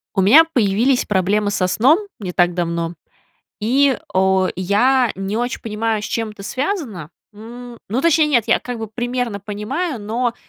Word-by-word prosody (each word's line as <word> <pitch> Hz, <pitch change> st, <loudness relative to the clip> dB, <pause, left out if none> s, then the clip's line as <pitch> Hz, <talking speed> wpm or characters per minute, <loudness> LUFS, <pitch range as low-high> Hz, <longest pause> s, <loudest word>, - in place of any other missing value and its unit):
У 195 Hz, -, +2 dB
меня 260 Hz, +13 st, +7 dB
появились 245 Hz, -3 st, +1 dB
проблемы 205 Hz, +1 st, +1 dB
со 185 Hz, -2 st, 0 dB
сном 255 Hz, -, +3 dB, 0.2 s
не 185 Hz, -4 st, -5 dB
так 175 Hz, 0 st, +2 dB
давно, 170 Hz, -1 st, -2 dB, 0.7 s
и, 265 Hz, +4 st, +2 dB, 0.2 s
о, 190 Hz, 0 st, +2 dB
я 235 Hz, +7 st, +2 dB
не 195 Hz, +2 st, -4 dB
очень 245 Hz, +2 st, -2 dB
понимаю, 220 Hz, -1 st, -2 dB
с -, -, -4 dB
чем 225 Hz, 0 st, -3 dB
это 205 Hz, -1 st, -12 dB
связано. 255 Hz, -, -4 dB, 0.2 s
М, 235 Hz, +3 st, -11 dB
ну, 230 Hz, +6 st, -1 dB
точнее, 320 Hz, -2 st, +4 dB
нет, 250 Hz, -7 st, +2 dB
я 235 Hz, -, +4 dB
как 245 Hz, -1 st, -6 dB
бы 225 Hz, -1 st, -5 dB
примерно 240 Hz, -1 st, -3 dB
понимаю, 225 Hz, -, -4 dB
но 230 Hz, +3 st, -2 dB
220 Hz, 165 wpm, -19 LUFS, 195-250 Hz, 0.7 s, меня